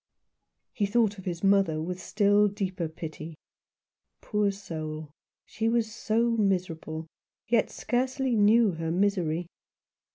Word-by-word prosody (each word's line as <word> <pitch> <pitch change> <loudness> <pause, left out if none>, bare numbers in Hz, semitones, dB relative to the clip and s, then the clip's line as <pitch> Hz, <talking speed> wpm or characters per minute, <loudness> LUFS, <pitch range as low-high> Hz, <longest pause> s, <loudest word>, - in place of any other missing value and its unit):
He 205 -4 0
thought 210 -2 +1
of 190 - -11
his 175 -1 -4
mother 195 -5 +3
with 180 +3 -4
still 205 0 +3
deeper 190 -4 -3
pity. 160 0 -8 0.8
Poor 210 -1 0
soul! 155 -6 -6 0.3
she 225 0 -1
was 225 -2 0
so 230 +1 +1
miserable, 180 -7 -1 0.4
yet 230 -2 +2
scarcely 255 +1 -1
knew 215 +1 +5
her 165 -1 -4
misery. 175 -2 +1
200 Hz, 120 wpm, -28 LUFS, 165-220 Hz, 0.8 s, knew